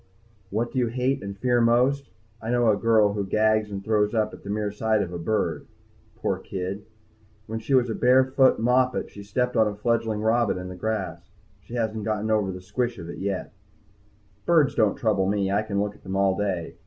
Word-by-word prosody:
_ -, -, -34 dB, 0.5 s
What 115 Hz, +4 st, -2 dB
do 130 Hz, -, -1 dB
you 120 Hz, -, +2 dB
hate 130 Hz, +3 st, -1 dB
and 100 Hz, 0 st, -6 dB
fear 120 Hz, +3 st, +2 dB
the 115 Hz, -, +4 dB
most? 130 Hz, +4 st, +2 dB, 0.3 s
I 110 Hz, -, -5 dB
know 120 Hz, -2 st, +3 dB
a -, -, +2 dB
girl 110 Hz, -2 st, +3 dB
who 100 Hz, -1 st, -1 dB
gags 110 Hz, +2 st, +2 dB
and 100 Hz, -1 st, -5 dB
throws 105 Hz, 0 st, +1 dB
up 110 Hz, 0 st, +1 dB
at -, -, -11 dB
the 100 Hz, -, -9 dB
mere 105 Hz, 0 st, -1 dB
sight 110 Hz, 0 st, +1 dB
of 90 Hz, -2 st, -7 dB
a 85 Hz, -, -4 dB
bird. 110 Hz, +6 st, -1 dB, 0.5 s
Poor -, -, -2 dB
kid, 95 Hz, +2 st, -5 dB, 0.6 s
when 110 Hz, +1 st, -4 dB
she 125 Hz, +5 st, 0 dB
was 125 Hz, -1 st, +4 dB
a 115 Hz, -, -2 dB
barefoot 130 Hz, +2 st, +4 dB
moppet 125 Hz, +2 st, +1 dB
she 100 Hz, -, -10 dB
stepped 125 Hz, +5 st, -1 dB
on 110 Hz, -1 st, +4 dB
a 105 Hz, -, -3 dB
fledgling 110 Hz, 0 st, 0 dB
robin 115 Hz, -2 st, +2 dB
in 90 Hz, 0 st, -6 dB
the 90 Hz, -, -7 dB
grass. 105 Hz, +1 st, -4 dB, 0.3 s
She 100 Hz, +5 st, -10 dB
hasn't 110 Hz, -2 st, -2 dB
gotten 110 Hz, 0 st, -1 dB
over 105 Hz, -3 st, +1 dB
the 90 Hz, 0 st, -8 dB
squish 120 Hz, +5 st, -2 dB
of 85 Hz, -2 st, -8 dB
it -, -, -7 dB
yet. 95 Hz, 0 st, -3 dB, 0.9 s
Birds 155 Hz, -5 st, +4 dB
don't 105 Hz, -3 st, +2 dB
trouble 100 Hz, -4 st, +1 dB
me. 100 Hz, -1 st, 0 dB
I 100 Hz, +2 st, +2 dB
can 105 Hz, -2 st, -2 dB
look 105 Hz, 0 st, -1 dB
at -, -, -21 dB
them 95 Hz, 0 st, -5 dB
all 95 Hz, -1 st, +2 dB
day. 95 Hz, -5 st, -3 dB
110 Hz, 220 wpm, -25 LUFS, 100-120 Hz, 0.9 s, the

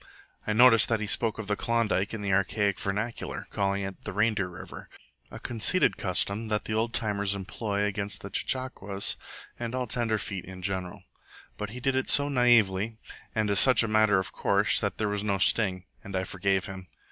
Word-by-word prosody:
I 110 Hz, -, +1 dB
noticed 115 Hz, 0 st, +6 dB
that 115 Hz, -2 st, +1 dB
he 105 Hz, -, -3 dB
spoke 110 Hz, +2 st, +1 dB
of 110 Hz, -, -5 dB
the 105 Hz, +1 st, -1 dB
Klondike 110 Hz, -3 st, 0 dB
in 110 Hz, -, -5 dB
the 100 Hz, -1 st, 0 dB
archaic 100 Hz, +1 st, +1 dB
vernacular, 105 Hz, +4 st, -4 dB
calling 100 Hz, 0 st, -1 dB
it 95 Hz, 0 st, -7 dB
the -, -, -5 dB
Reindeer 105 Hz, -3 st, +1 dB
River 85 Hz, -1 st, -10 dB, 0.4 s
a -, -, -9 dB
conceited 120 Hz, +10 st, +1 dB
custom 100 Hz, +3 st, 0 dB
that 105 Hz, -1 st, -1 dB
the 110 Hz, -, -4 dB
Old 115 Hz, +2 st, 0 dB
Timers 105 Hz, -4 st, 0 dB
employ 100 Hz, +1 st, -3 dB
against 100 Hz, 0 st, -3 dB
the 100 Hz, -, -8 dB
CHECHAQUAS 100 Hz, -5 st, -1 dB, 0.4 s
and 120 Hz, +1 st, -4 dB
all 130 Hz, -1 st, -1 dB
tenderfeet 110 Hz, -5 st, -2 dB
in 95 Hz, -1 st, -10 dB
general. 95 Hz, 0 st, -4 dB, 0.5 s
But 105 Hz, -, -5 dB
he 120 Hz, +4 st, -8 dB
did 135 Hz, +1 st, 0 dB
it 130 Hz, -, -1 dB
so 145 Hz, 0 st, +5 dB
naively 115 Hz, -5 st, +3 dB, 0.4 s
and 110 Hz, -2 st, +1 dB
as 100 Hz, -, +4 dB
such 125 Hz, +1 st, +7 dB
a -, -, -1 dB
matter 110 Hz, -2 st, +3 dB
of 95 Hz, -, -2 dB
course, -, -, +3 dB
that -, -, -2 dB
there 105 Hz, -, -1 dB
was 105 Hz, 0 st, -2 dB
no 100 Hz, -2 st, 0 dB
sting, 95 Hz, -2 st, +2 dB, 0.2 s
and 100 Hz, -1 st, -7 dB
I 95 Hz, -, 0 dB
forgave 95 Hz, 0 st, -1 dB
him. 95 Hz, -1 st, -8 dB
105 Hz, 195 wpm, -27 LUFS, 95-115 Hz, 0.5 s, such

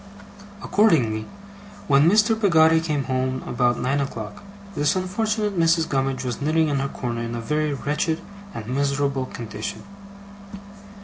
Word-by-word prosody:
Accordingly, 125 Hz, -, +2 dB, 0.6 s
when 140 Hz, +3 st, +5 dB
Mr. 215 Hz, +3 st, +4 dB
Peggotty 165 Hz, -7 st, +4 dB
came 150 Hz, -4 st, -1 dB
home 130 Hz, 0 st, -2 dB
about 120 Hz, 0 st, +1 dB
nine 135 Hz, +3 st, 0 dB
o'clock, 110 Hz, -7 st, -6 dB, 0.3 s
this 145 Hz, 0 st, +1 dB
unfortunate 210 Hz, +3 st, -1 dB
Mrs. 165 Hz, 0 st, +3 dB
Gummidge 135 Hz, -1 st, -1 dB
was 125 Hz, -1 st, -4 dB
knitting 155 Hz, +2 st, +2 dB
in 140 Hz, -2 st, 0 dB
her 135 Hz, -, -1 dB
corner, 120 Hz, -3 st, -4 dB
in 115 Hz, 0 st, -4 dB
a -, -, -3 dB
very 150 Hz, +5 st, -1 dB
wretched 150 Hz, +3 st, -1 dB, 0.4 s
and 110 Hz, -, -6 dB
miserable 140 Hz, +1 st, -1 dB
condition. 110 Hz, -2 st, -6 dB
140 Hz, 135 wpm, -23 LUFS, 125-165 Hz, 0.6 s, when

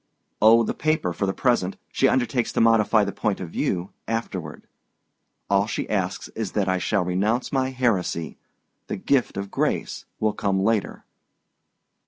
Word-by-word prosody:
"Oh, 115 Hz, +2 st, +7 dB
the -, -, -1 dB
paper 155 Hz, -, 0 dB
for 100 Hz, -, -1 dB
the -, -, +1 dB
present. 100 Hz, -4 st, 0 dB
She -, -, +3 dB
undertakes 125 Hz, -1 st, +1 dB
to -, -, 0 dB
modify 115 Hz, -1 st, +4 dB
the 100 Hz, -, -2 dB
point 100 Hz, +1 st, -1 dB
of 85 Hz, -3 st, -6 dB
view 90 Hz, +1 st, -2 dB, 0.2 s
afterward. 100 Hz, -8 st, -4 dB, 0.8 s
All 100 Hz, +1 st, +2 dB
she 110 Hz, -, -3 dB
asks 95 Hz, -2 st, -2 dB
is 110 Hz, -4 st, -5 dB
that 100 Hz, -2 st, 0 dB
I 95 Hz, 0 st, +1 dB
shall 100 Hz, -1 st, 0 dB
renounce 105 Hz, +7 st, 0 dB
my 130 Hz, -1 st, +1 dB
heresy: 100 Hz, -, -1 dB, 0.5 s
the -, -, -3 dB
gift 130 Hz, -7 st, +1 dB
of 100 Hz, 0 st, -4 dB
grace -, -, -1 dB
will 110 Hz, -1 st, +1 dB
come 100 Hz, -2 st, 0 dB
later." 110 Hz, -1 st, 0 dB
105 Hz, 160 wpm, -24 LUFS, 95-115 Hz, 0.8 s, Oh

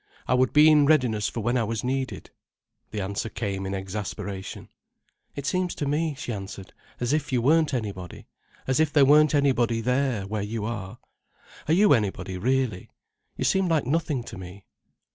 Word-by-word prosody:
I -, -, +2 dB
would 125 Hz, 0 st, +3 dB
be 150 Hz, +1 st, +6 dB
in 150 Hz, -2 st, +6 dB
readiness 125 Hz, -9 st, +2 dB
for 115 Hz, -, -5 dB
when 120 Hz, +4 st, +1 dB
I -, -, +1 dB
was 110 Hz, 0 st, -3 dB
needed." 130 Hz, +1 st, -3 dB, 0.6 s
The 105 Hz, -, -4 dB
answer 100 Hz, +3 st, -3 dB
came 100 Hz, -4 st, -4 dB
in 95 Hz, -, -3 dB
exasperation. 95 Hz, 0 st, -6 dB, 0.7 s
"It 140 Hz, -, -5 dB
seems 180 Hz, +3 st, -1 dB
to 145 Hz, -, -3 dB
me," 150 Hz, +2 st, 0 dB
she 120 Hz, -, -4 dB
answered, 95 Hz, -1 st, -8 dB, 0.3 s
"as 125 Hz, +3 st, 0 dB
if 150 Hz, -2 st, -1 dB
you 125 Hz, -, +2 dB
weren't 155 Hz, +5 st, +3 dB
anybody—as 110 Hz, -, -5 dB
if 155 Hz, -2 st, +2 dB
there 145 Hz, -2 st, +5 dB
weren't 150 Hz, +2 st, +5 dB
anybody 125 Hz, -5 st, +2 dB
there, 125 Hz, -3 st, 0 dB
where 105 Hz, +1 st, -3 dB
you 105 Hz, +1 st, -3 dB
are. 105 Hz, -1 st, -5 dB, 0.7 s
Are 155 Hz, -, +3 dB
you 205 Hz, 0 st, +5 dB
anybody, 100 Hz, -5 st, -1 dB
really? 125 Hz, -3 st, 0 dB, 0.5 s
You -, -, -2 dB
seem 190 Hz, -1 st, +2 dB
like 160 Hz, -5 st, +1 dB
nothing 145 Hz, -2 st, -1 dB
to 95 Hz, -, -9 dB
me." 95 Hz, +2 st, -10 dB
120 Hz, 175 wpm, -25 LUFS, 105-145 Hz, 0.7 s, be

